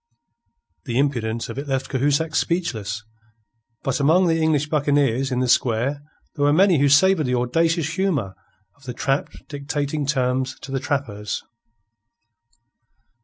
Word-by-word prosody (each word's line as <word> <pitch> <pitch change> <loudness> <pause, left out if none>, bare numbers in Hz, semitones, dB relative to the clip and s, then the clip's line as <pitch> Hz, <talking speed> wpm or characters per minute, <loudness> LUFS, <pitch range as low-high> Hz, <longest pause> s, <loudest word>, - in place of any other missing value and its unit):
The 120 -1 -2
impudence 115 -5 -1
of - - -6
it 145 - -6
left 135 -1 -2
Cahusac 145 +4 +1
speechless. 115 - -1 0.8
But 135 +1 -1
among 160 +7 +4
the 165 -1 +1
English 155 -2 +1
buccaneers 140 -4 +1
in 125 0 0
the 130 - 0
square 125 +4 +1 0.3
there 145 - -2
were 145 - +4
many 180 0 +4
who 140 0 +3
savoured 155 +1 +4
the 125 - +1
audacious 165 +6 0
humour 165 - -1 0.4
of 145 -1 -22
the 125 - -5
trapped 135 +2 -2
dictating 145 0 -3
terms 130 -2 0
to 135 - -9
the 135 - -1
trappers. 115 -8 -3
140 Hz, 140 wpm, -22 LUFS, 125-155 Hz, 0.8 s, among